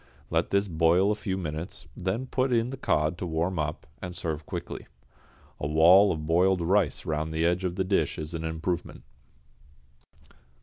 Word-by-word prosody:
Let - - +1
this 100 +1 +2
boil 85 +3 +3
a 105 - -3
few 95 -2 -2
minutes, 80 0 -5
then 95 +8 -2
put 130 0 0
in 120 +1 +1
the - - -4
cod 75 - 0
to 90 - -3
warm 85 +2 -1
up, 75 0 -3 0.2
and 90 -1 -6
serve 80 -3 -4
quickly. - - -6 0.7
A 75 - -2
wall 85 +7 +6
of 75 -1 -3
boiled 90 +3 +3
rice 90 -1 +1
round 80 0 -2
the 80 +1 0
edge 90 +2 +1
of 90 -1 -2
the 95 - 0
dish 95 -6 0
is 75 +2 -6
an 80 -1 -4
improvement. 80 +2 -3
85 Hz, 175 wpm, -27 LUFS, 80-95 Hz, 0.7 s, wall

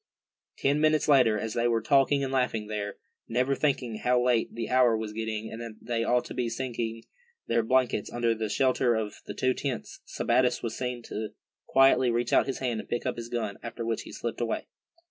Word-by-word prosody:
Ten 145 +2 +1
minutes 155 0 +3
later, 125 -7 +5
as 110 0 -3
they 120 0 +1
were 115 -1 +2
talking 140 +3 +3
and 135 0 -2
laughing 125 -4 0
there, 105 -1 -4 0.3
never 125 +4 +1
thinking 130 -6 0
how 125 0 +2
late 125 -2 +2
the 115 -1 -3
hour 125 -3 +4
was 110 -1 -5
getting, 110 0 -4
and 115 - -6
that 115 -2 -7
they 115 -1 -2
ought 125 +1 +2
to - - -7
be 120 -2 -1
seeking 115 -2 -3 0.4
their 115 0 +2
blankets 125 -2 +1
under 120 -1 +1
the 110 -1 -3
shelter 130 0 +2
of 110 -2 -3
the - - -6
two 130 0 +2
tents, 130 -4 -4
Sebattis 125 +1 +1
was 115 -1 -3
seen 125 -2 -4
to 110 -1 -5 0.3
quietly 135 -1 +5
reach 120 +1 0
out - - +4
his 135 - -2
hand, 120 -4 -2
and - - -9
pick 120 - -2
up 125 - -1
his 115 0 -7
gun, 115 -4 -3
after 115 0 -5
which 115 -1 -1
he - - -10
slipped 120 0 -4
away. 115 - -1
120 Hz, 210 wpm, -28 LUFS, 115-130 Hz, 0.4 s, later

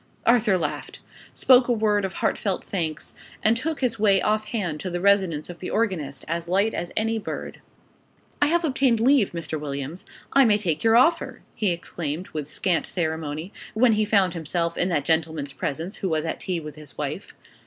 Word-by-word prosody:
Arthur 230 -5 +4
laughed; 175 - -4 0.4
spoke 255 -1 +5
a - - +1
word 210 -3 +2
of 190 - -4
heartfelt 195 -3 -1
thanks; 165 -5 -3 0.3
and 220 +2 +4
took 300 +5 -3
his 235 -3 0
way 200 -2 +4
off 215 +2 +1
hand 195 -9 -3
to 185 - -4
the 175 0 -3
residence 190 -5 +2
of 175 -1 -9
the 185 - -5
organist 170 -12 -2
as 170 +1 -3
light 200 +5 +2
as 175 - -4
any 225 +1 +1
bird. - - -6 0.8
"I 290 - +5
have 340 +2 +2
obtained 265 -5 +2
leave, 250 -2 +4
Mr. 165 -2 -4
Williams; 145 +3 -5 0.3
I 275 - +7
may 215 -4 +4
take 170 -7 -1
your 225 0 +5
offer!" 330 +7 +2
he 210 - 0
exclaimed 170 -1 -4
with 150 -3 -5
scant 180 -1 0
ceremony, 160 0 -3 0.2
when 235 +1 +5
he 215 0 +2
found 200 -4 +2
himself 170 +1 -2
in 180 - +1
that 150 -5 0
gentleman's 160 -3 0
presence, 165 +7 -4
who 190 - -2
was 160 -1 0
at 160 - -3
tea 180 -2 -2
with 150 -2 -8
his 150 -2 -11
wife. - - -5
185 Hz, 190 wpm, -24 LUFS, 160-220 Hz, 0.8 s, I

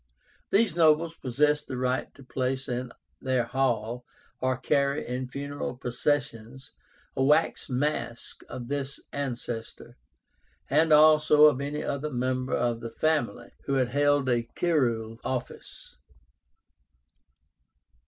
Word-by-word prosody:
These 200 -4 +2
nobles 160 0 +4
possessed 150 +2 0
the 130 - -4
right 130 +1 -1
to 140 - -14
place 130 +1 -2
in 125 0 -3 0.3
their 130 -2 +1
hall, 120 -1 -1 0.4
or 130 0 0
carry 140 +1 0
in 125 +1 -3
funeral 140 -1 -5
processions, 125 -1 -2 0.4
a - - -1
wax 150 +2 +2
mask 130 -2 -3
of 120 -2 -7
this 140 0 -3
ancestor, 120 -4 -5 0.7
and 160 0 +3
also 150 0 +7
of 140 -3 +4
any 145 +1 -3
other 140 +2 -3
member 130 0 -1
of 120 -1 0
the 115 - -6
family 155 +6 -1
who 140 - -1
had 130 -2 +1
held 145 0 +2
a 120 -2 +2
curule 115 -9 0
office. 125 -1 -6
130 Hz, 120 wpm, -27 LUFS, 125-150 Hz, 0.7 s, also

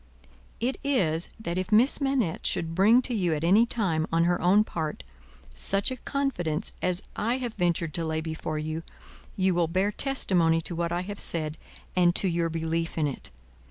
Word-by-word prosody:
"It 255 +3 -1
is, 175 - +1
that 175 -4 -3
if 185 +1 -4
Miss 240 +7 +4
Manette 270 -11 0
should 165 -1 -1
bring 215 +8 +5
to 250 - -2
you 180 -7 +1
at 150 - -4
any 205 +7 +5
time, 175 -10 -1
on 165 0 +3
her 175 +1 +1
own 195 +4 +5
part, 160 -7 -4 0.5
such 200 +5 +3
a - - -2
confidence 235 - -2
as 180 +1 0
I 235 +4 0
have 245 -3 -4
ventured 170 -4 0
to 165 - -2
lay 160 0 -1
before 160 -1 -4
you, 155 +1 -3 0.6
you 190 0 +2
will 170 -1 +1
bear 190 +5 +1
testimony 180 -11 +2
to 175 - -2
what 170 0 -2
I 175 +1 0
have 200 +2 -6
said, 155 -2 +1 0.4
and 175 -1 +4
to 195 - 0
your 170 -1 0
belief 165 +1 -2
in 155 - +2
it. 140 - -3
175 Hz, 190 wpm, -27 LUFS, 165-210 Hz, 0.6 s, bring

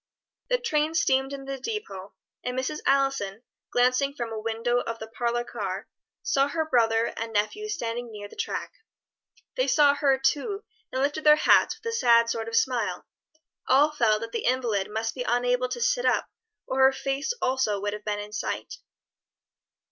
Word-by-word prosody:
The - - +3
train 320 -9 0
steamed 265 -4 +2
into 275 -1 -5
the - - -16
depôt, 250 - -6 0.3
and 250 0 -3
Mrs. 260 +4 -2
Allison, 270 -7 +1 0.3
glancing 255 +3 +2
from 235 -4 -4
a 220 - -4
window 230 +2 0
of 230 -1 -4
the 220 - -7
parlor 235 +2 -2
car, 200 -4 -5 0.4
saw 275 0 +2
her 315 +2 -1
brother 230 -5 +2
and 225 0 -4
nephews 415 - -1
standing 235 -3 -4
near 205 -1 -8
the - - -15
track. - - -3 0.9
They - - +2
saw 290 -2 +5
her, 280 -2 +2
too, 300 - 0 0.3
and 260 +1 0
lifted 290 +2 -1
their 300 0 +8
hats 305 - +4
with - - -25
a 460 0 -1
sad 235 - +4
sort 225 -1 -3
of 230 - -3
smile. 230 -10 0 0.6
All 285 +4 +5
felt 220 -7 +2
that 230 0 -6
the 235 - -3
invalid 235 -6 0
must 225 +1 -2
be 255 - -6
unable 245 +1 +1
to 480 - -4
sit - - +1
up - - +1 0.3
or 260 - -2
her 265 0 +7
face 270 - -2
also 255 -6 0
would 205 +1 -2
have 210 0 -7
been 210 -1 -2
in 205 0 -7
sight. 220 - -4
250 Hz, 180 wpm, -26 LUFS, 225-280 Hz, 0.9 s, their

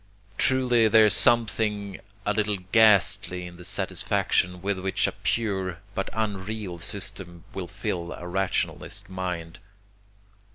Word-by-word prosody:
Truly 125 -3 +3
there 110 0 +7
is 105 - +4
something 110 -4 +2 0.3
a 105 - +1
little 105 -1 0
ghastly 100 -4 +4
in 90 0 -10
the 90 - -11
satisfaction 90 +1 0
with 100 -1 -1
which 95 +1 0
a - - 0
pure 95 -6 -1 0.2
but 95 - -2
unreal 105 -3 -3
system 95 -2 -4
will 95 -2 -5
fill 95 -3 -4
a 90 - -8
rationalist 95 +1 -2
mind. 90 -2 -4
95 Hz, 125 wpm, -26 LUFS, 90-110 Hz, 0.3 s, there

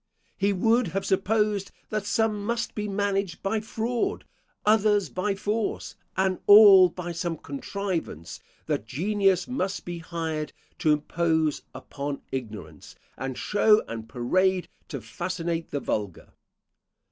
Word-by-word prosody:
He 200 +1 +1
would 225 +4 +2
have 195 - -2
supposed 205 +1 +1 0.2
that 215 -2 -2
some 215 -1 +1
must 235 +2 -2
be 210 -1 -3
managed 195 -3 -1
by 215 +3 0
fraud, 225 +2 -2 0.4
others 210 -2 +3
by 195 +2 -1
force, 210 +2 -2 0.2
and 190 -1 +1
all 205 -3 +9
by 175 -1 -6
some 170 -1 -3
contrivance; 165 - -5 0.3
that 105 - -2
genius 195 - +1
must 200 -7 -3
be 175 -1 -5
hired 165 -2 -4 0.3
to 155 - +3
impose 160 0 +1
upon 140 0 -5
ignorance, 105 - -7 0.2
and 130 0 -5
show 210 +1 +3
and 115 -1 -7
parade 180 +10 +1 0.2
to 140 -6 -6
fascinate 165 +7 -3
the 145 - -2
vulgar. 105 -8 -3
185 Hz, 125 wpm, -26 LUFS, 155-205 Hz, 0.4 s, all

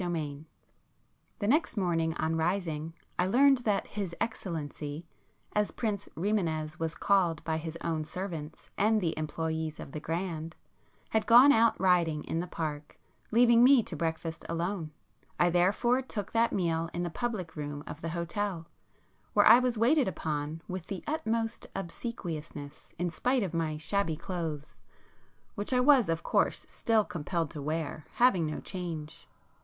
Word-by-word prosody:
[p 180 - -2
43]V 155 -3 -3 0.9
The 205 - -2
next 295 +1 +2
morning 165 -4 +1
on 160 0 0
rising 165 -2 -1 0.2
I 180 - +3
learned 270 +5 +5
that 210 -5 0
'his 195 -5 -4
excellency' 160 -6 -4 0.5
as 210 -1 +2
Prince 210 -4 -3
Rimânez 160 -5 -1
was 165 0 -2
called 180 -6 +2
by 160 -1 -1
his 160 +1 -5
own 160 -2 -1
servants 165 -3 -6
and 215 +2 +4
the 170 -5 0
employés 160 0 -3
of - - -8
the 155 - -5
'Grand,' 165 0 -3 0.6
had 220 -1 +1
gone 245 +5 +9
out 230 -3 +4
riding 175 -5 +3
in 165 - -2
the 180 - -3
Park, 150 -3 -5 0.3
leaving 235 +1 +6
me 255 -2 +7
to 175 - -6
breakfast 160 +1 -3
alone. 170 0 -2 0.5
I 175 0 +4
therefore 205 +9 +3
took 215 -6 -5
that 230 +1 +3
meal 165 -3 0
in 175 - -1
the 175 - -3
public 200 -7 -3
room 145 -1 -5
of 155 - -8
the 165 - -3
hotel, 170 +1 -2 0.7
where - - +5
I 240 - +9
was 250 -2 0
waited 255 +5 +4
upon 155 -2 -3
with 185 -1 -5
the 195 -3 -5
utmost 230 -6 -2
obsequiousness, 165 - -6
in 175 0 -1
spite 250 +6 +1
of 185 - -3
my 160 -2 -1
shabby 165 +1 0
clothes, 160 -3 -5 0.7
which 205 +2 -3
I 250 - +3
was 250 - +5
of 165 0 -1
course - - +1
still 220 -2 +1
compelled 165 -1 -2
to 150 - -6
wear, 155 0 -3
having 195 -10 +4
no 155 - -3
change. 165 -5 -6
170 Hz, 160 wpm, -30 LUFS, 160-210 Hz, 0.9 s, gone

